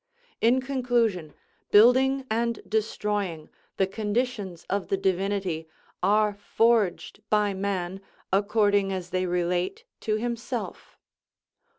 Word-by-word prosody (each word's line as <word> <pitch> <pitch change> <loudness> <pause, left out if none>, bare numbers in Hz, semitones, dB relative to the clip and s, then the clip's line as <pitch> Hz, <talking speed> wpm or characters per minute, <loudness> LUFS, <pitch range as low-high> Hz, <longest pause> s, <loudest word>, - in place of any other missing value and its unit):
In 245 +3 +4
conclusion, 240 - 0 0.3
building 260 +5 +5
and 235 +1 -1
destroying, 210 -6 -2 0.3
the 190 - +3
conditions 205 -3 -3
of 200 -1 -2
the 195 - 0
Divinity, 190 -3 -1 0.3
are 210 +2 +3
forged 205 -1 +1
by 210 -1 +2
man, 190 -1 -3 0.3
according 205 -1 +2
as 185 -2 -5
they 185 0 0
relate 180 - -1 0.2
to 215 - -1
himself. 235 +1 -4
205 Hz, 100 wpm, -26 LUFS, 190-230 Hz, 0.3 s, building